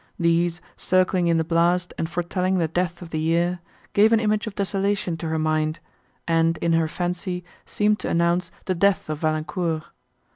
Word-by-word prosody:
These, 170 0 +1 0.2
circling 185 -1 +2
in 165 -1 +3
the 160 - +2
blast 170 +2 +1
and 165 - -3
foretelling 180 +2 -1
the 165 -2 +1
death 175 +2 -2
of 165 - -11
the 155 - -1
year, 170 +3 +1 0.3
gave 215 +2 +5
an 225 - +5
image 215 0 0
of 205 - -6
desolation 200 -2 -1
to 165 - -5
her 160 0 -1
mind, 155 0 0 0.5
and, 165 0 +2
in 170 0 0
her 165 -1 +2
fancy, 180 +2 -3 0.2
seemed 210 0 +1
to - - -3
announce 170 +1 +1 0.2
the 185 - 0
death 185 -3 +1
of 150 - -4
Valancourt. 155 +1 -1
175 Hz, 180 wpm, -24 LUFS, 165-185 Hz, 0.5 s, gave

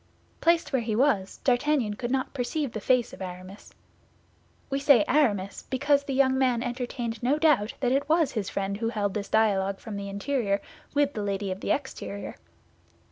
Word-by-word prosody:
Placed 335 -3 +2
where 260 - +2
he 220 -2 -2
was, 225 -7 +1
D'Artagnan 255 -3 +2
could 240 +3 -4
not 260 0 -1
perceive 275 +1 -2
the 220 - -4
face 250 +2 +2
of - - -11
Aramis. 185 +2 -8 1.0
We 275 - 0
say 275 -7 +5
Aramis, 205 -9 +1
because 280 +1 +2
the 275 - -3
young 265 -1 +3
man 250 -3 +2
entertained 240 -2 -4
no 260 +5 +2
doubt 300 -9 +2
that 250 -2 +2
it 280 +2 0
was 320 -3 +3
his 205 -4 -3
friend 200 0 -2
who 225 +1 -1
held 205 -4 -1
this 200 -2 -4
dialogue 200 -3 +2
from 215 -2 -7
the 200 0 -5
interior 200 0 -1 0.4
with 285 0 +2
the 215 - -3
lady 200 -1 -2
of 185 - -4
the - - -5
exterior. 265 -7 -3
240 Hz, 185 wpm, -27 LUFS, 200-275 Hz, 1.0 s, say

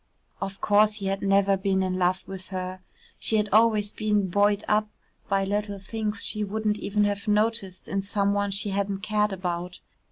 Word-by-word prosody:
Of 195 0 -5
course 210 +1 +4
he 200 -2 -6
had 195 0 -1
never 195 0 +3
been 190 0 0
in 185 0 -1
love 185 +1 +1
with 190 -1 -7
her. 185 0 -5 0.4
She 220 - +1
had 210 0 +1
always 215 -2 +4
been 210 -3 0
buoyed 205 +2 +2
up 215 0 +2 0.4
by 195 -1 +2
little 205 0 -2
things 210 +2 -2
she 210 -1 -1
wouldn't 210 +1 -1
even 205 +1 0
have 205 +1 -1
noticed 210 -3 0
in 195 - -1
some 200 0 0
one 205 0 0
she 200 +1 0
hadn't 200 0 -1
cared 210 -1 +1
about. 180 -1 -4
200 Hz, 185 wpm, -26 LUFS, 195-210 Hz, 0.4 s, course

